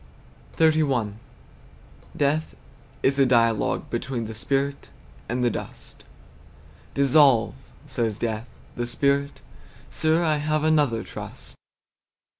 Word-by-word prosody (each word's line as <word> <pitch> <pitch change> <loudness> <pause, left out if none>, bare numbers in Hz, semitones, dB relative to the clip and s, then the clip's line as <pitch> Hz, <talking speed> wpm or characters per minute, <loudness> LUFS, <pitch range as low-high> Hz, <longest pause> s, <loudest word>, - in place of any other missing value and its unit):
XXXI. 145 -9 +2 1.0
Death 150 +2 0 0.5
is 135 +1 +2
a 135 - +6
dialogue 115 -3 +2
between 125 -4 -3
The 110 - -6
spirit 140 +5 -2 0.4
and 125 +2 -1
the 120 - +3
dust. - - -8 0.9
"Dissolve," 140 -4 +4 0.3
says 110 -3 -2
Death. 115 0 -3 0.3
The 120 0 -3
Spirit, 140 +3 0 0.5
"Sir, 160 +2 +1
I 155 -2 +2
have 155 +1 0
another 145 -8 +2
trust." - - -10
135 Hz, 100 wpm, -24 LUFS, 115-150 Hz, 1.0 s, a